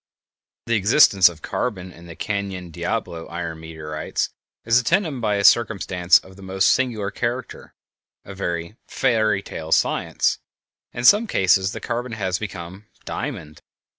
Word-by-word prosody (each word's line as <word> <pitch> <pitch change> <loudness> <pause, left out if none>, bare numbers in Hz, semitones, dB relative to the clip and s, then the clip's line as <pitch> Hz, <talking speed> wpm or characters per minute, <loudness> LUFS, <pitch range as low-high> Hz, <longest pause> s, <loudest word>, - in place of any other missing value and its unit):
The 115 - -1
existence 100 -3 +6
of 80 -3 -13
carbon 95 -7 -3
in 85 0 -14
the 85 - -10
Canyon 100 -4 -4
Diablo 80 +1 -4
iron 85 -1 -5
meteorites 80 -1 -4 0.4
is 115 +2 +4
attended 160 -4 0
by 105 -2 +1
a 100 - -1
circumstance 100 -6 +4
of 95 0 -12
the - - -13
most 95 0 +1
singular 110 -6 0
character—a 120 -4 -7
very 85 +1 -4
"fairy 110 -6 +1
tale 80 - -7
of - - +5
science." - - 0 0.5
In 120 - -6
some 210 - +6
cases 95 - +2
_the - - -8
carbon 120 0 -3
has 95 -4 -2
become 95 -1 -8 0.2
diamond! 95 - -6
100 Hz, 140 wpm, -22 LUFS, 85-115 Hz, 0.5 s, existence